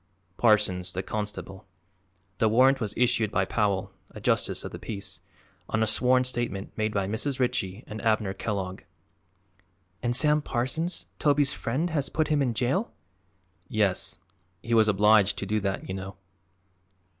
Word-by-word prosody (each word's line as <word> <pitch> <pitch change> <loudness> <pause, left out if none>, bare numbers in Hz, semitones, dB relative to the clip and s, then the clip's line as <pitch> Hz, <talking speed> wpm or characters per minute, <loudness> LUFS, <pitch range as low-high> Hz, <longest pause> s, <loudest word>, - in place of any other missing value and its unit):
"Parsons, 95 -6 +2
the 95 - -3
constable. 105 -1 -5 0.7
The 110 - +4
warrant 130 +4 +5
was 105 -2 -2
issued 120 -3 +2
by 95 -2 +1
Powell, 100 -2 0 0.2
a - - -10
justice - - +1
of - - -6
the - - -8
peace, 100 -2 -4 0.5
on 110 0 +1
a - - +3
sworn 125 +3 +3
statement 120 -6 -3
made 110 0 0
by 100 -2 0
Mrs. 120 +7 -2
Ritchie 120 -5 -1
and 110 0 -7
Abner 110 -3 +1
Kellogg." 95 -3 -4 1.2
"And 120 0 0
Sam 150 +3 +4
Parsons 150 +7 -2
Toby's 145 -2 +3
friend 155 +9 -2
has 145 -3 0
put 155 0 0
him 150 -2 +2
in 125 -4 0
jail?" 135 - 0 0.8
"Yes; 95 -2 0 0.5
he 115 - -2
was 110 -1 +5
obliged 105 0 +4
to - - -3
do 105 +2 0
that, 95 -1 -3
you 95 - -4
know." 95 0 -7
110 Hz, 155 wpm, -27 LUFS, 100-125 Hz, 1.2 s, warrant